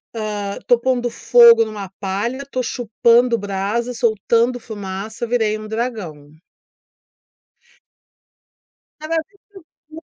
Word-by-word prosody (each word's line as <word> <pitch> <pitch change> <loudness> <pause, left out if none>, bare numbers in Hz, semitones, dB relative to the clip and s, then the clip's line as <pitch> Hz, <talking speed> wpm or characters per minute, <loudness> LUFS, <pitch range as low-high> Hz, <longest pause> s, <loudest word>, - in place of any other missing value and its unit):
hã, 210 -2 -4
tô 245 - +4
pondo 245 -1 0
fogo 235 0 +6
numa 205 -3 -7
palha, 210 +8 -3
tô 255 -1 -2
chupando 235 +1 +2
brasa, 205 +4 -2
soltando 235 +1 +1
fumaça, 210 +1 -6
virei 220 -3 0
um 215 0 -9
dragão." 210 -11 -5 2.7
Cada 310 +2 -3
vez 320 -1 -1 0.5
que 310 - -23
eu 320 - -9
230 Hz, 110 wpm, -19 LUFS, 205-245 Hz, 2.7 s, fogo